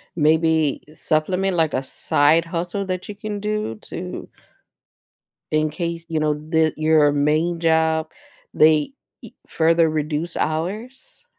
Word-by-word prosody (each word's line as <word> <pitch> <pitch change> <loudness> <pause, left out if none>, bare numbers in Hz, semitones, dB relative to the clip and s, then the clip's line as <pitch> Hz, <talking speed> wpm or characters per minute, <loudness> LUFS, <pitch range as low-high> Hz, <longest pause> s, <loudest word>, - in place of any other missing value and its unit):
maybe 160 -1 +2
supplement, 180 +5 0
like, 160 -2 +1
a 135 - -1
side 150 +4 +2
hustle 175 +4 -3
that 185 -1 -4
you 210 - -6
can 210 0 -5
do 210 - -2
to - - -7 1.2
in 155 0 +1
case, 170 +1 -4
you 160 -2 -1
know, 150 -1 +1 0.2
that 160 -1 +2
your 155 -1 +4
main 155 +4 +1
job, 160 -1 +1 0.4
they 155 - +3 0.3
e - - -12
further 165 0 +3
reduce 155 +2 -3
hours? 220 - -4
160 Hz, 125 wpm, -21 LUFS, 155-175 Hz, 1.2 s, your